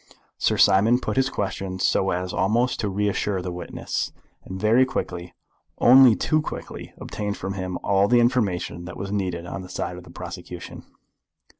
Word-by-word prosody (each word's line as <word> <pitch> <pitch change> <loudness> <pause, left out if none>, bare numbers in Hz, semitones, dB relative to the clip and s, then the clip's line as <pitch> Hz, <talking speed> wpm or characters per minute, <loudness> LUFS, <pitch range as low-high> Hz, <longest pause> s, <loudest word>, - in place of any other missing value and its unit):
Sir - - +2
Simon 110 +6 +5
put - - -3
his 135 0 +2
questions 95 -3 -3
so 95 - +2
as 90 0 -2
almost 115 +6 +1
to 105 - -1
reassure 100 0 0
the 90 - -4
witness; 90 -1 -4 0.3
and 95 0 -7
very 110 +5 +4
quickly, 90 -8 -4 0.4
only 125 -1 +7
too 155 - +1
quickly, - - -7
obtained 105 -1 -4
from 95 +1 -4
him 95 -2 -4
all 100 0 +3
the 120 +2 +4
information 100 -8 0
that 90 - -8
was 100 0 -5
needed 90 -4 -2
on 90 +2 -6
the 90 - -10
side 90 - -4
of 90 - -10
the - - -15
prosecution. - - -8
95 Hz, 170 wpm, -24 LUFS, 90-115 Hz, 0.4 s, only